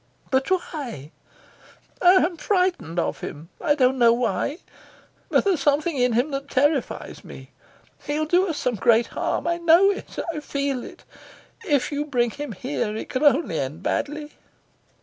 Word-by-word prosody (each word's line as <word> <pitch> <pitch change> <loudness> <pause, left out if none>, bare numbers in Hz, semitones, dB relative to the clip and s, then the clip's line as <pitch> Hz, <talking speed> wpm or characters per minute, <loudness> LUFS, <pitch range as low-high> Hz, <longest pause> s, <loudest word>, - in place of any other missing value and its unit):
"But 265 0 +1
why?" 280 - -3 0.9
"I'm 360 -1 +5
frightened 360 - 0
of 170 - -1
him. 155 +3 -8
I 295 -3 +3
don't 260 -2 +2
know 235 -1 +6
why, 240 - -1 0.7
but - - +3
there's 385 -6 +1
something 295 +4 +1
in 250 -2 +2
him 245 +6 +1
that 275 0 -4
terrifies 285 0 0
me. - - -12 0.6
He'll 300 +1 0
do 355 +5 +3
us 320 -4 -3
some 250 - 0
great 230 +3 +4
harm. - - -2
I 340 0 0
know 340 +4 +5
it. 395 - -8 0.2
I 305 - -4
feel 280 -3 -2
it. - - -12 0.6
If 290 -2 +1
you 290 0 -1
bring 240 -4 +1
him 290 -3 -6
here 185 +4 -3
it - - -6
can 255 - -2
only 290 - +3
end 145 +6 -4
badly." 295 +1 -2
280 Hz, 160 wpm, -23 LUFS, 240-320 Hz, 0.9 s, know